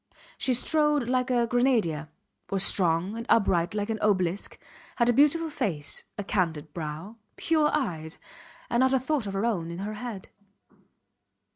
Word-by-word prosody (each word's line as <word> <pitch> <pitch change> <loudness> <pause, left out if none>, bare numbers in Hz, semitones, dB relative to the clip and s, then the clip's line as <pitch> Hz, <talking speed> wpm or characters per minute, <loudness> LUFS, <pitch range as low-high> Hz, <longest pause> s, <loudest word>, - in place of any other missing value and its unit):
She 255 - +2
strode 300 0 +2
like 255 0 +1
a 240 -2 +2
grenadier, 230 - +1 0.4
was 195 -1 +3
strong 180 +1 +2
and 230 - -4
upright 190 -5 +2
like 205 +1 -1
an 220 - -3
obelisk, 185 -2 0 0.4
had 235 -1 +2
a - - +4
beautiful 300 +5 +3
face, 160 - -2
a 205 - -3
candid 160 -7 -1
brow, 165 +7 -6 0.2
pure 310 -2 +2
eyes, 165 - -2 0.5
and 235 - +1
not 260 +1 +4
a - - +3
thought 265 -3 -1
of 195 - -4
her 195 +3 -1
own 180 -8 -1
in 170 - -6
her 205 +3 -4
head. 215 -3 -7
215 Hz, 160 wpm, -27 LUFS, 175-250 Hz, 0.5 s, a